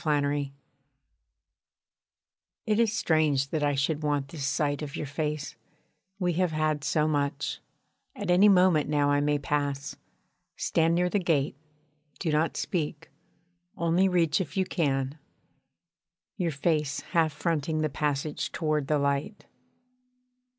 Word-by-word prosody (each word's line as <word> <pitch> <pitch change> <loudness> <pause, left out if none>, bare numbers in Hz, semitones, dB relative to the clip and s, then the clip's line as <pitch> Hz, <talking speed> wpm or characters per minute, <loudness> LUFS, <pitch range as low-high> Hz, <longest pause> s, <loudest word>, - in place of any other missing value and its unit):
PRISONERS 145 -2 +1 2.2
It 215 0 +1
is 230 -3 +3
strange 155 -9 +1
that 155 - -1
I 145 -1 +1
should 145 +3 0
want 145 -2 -1
this 140 -3 -4
sight 145 0 0
of 145 -2 -5
your - - -3
face 150 0 -3 0.6
we 180 -3 0
have 180 -1 0
had 155 -1 0
so 155 +1 +1
much: 145 -1 -1 0.6
at - - -2
any 195 +4 +6
moment 180 -6 +4
now 145 -1 +2
I 145 - +3
may 145 0 +2
pass, 140 -1 -2 0.6
stand 165 0 +2
near 180 +1 +2
the 205 +3 +1
gate, 150 -7 +1 0.6
do 165 - -1
not 155 +2 +1
speak 155 -4 -3 0.7
only 170 +3 +2
reach 170 -1 +2
if 180 +1 -6
you 190 - +2
can, 140 -4 -1 1.2
your 180 -5 -1
face 150 -1 0
half 160 -2 +3
fronting 155 0 -1
the - - +2
passage 145 +1 -2
toward 155 -4 -1
the 150 - +2
light. 140 +8 -1
150 Hz, 135 wpm, -28 LUFS, 145-170 Hz, 2.2 s, any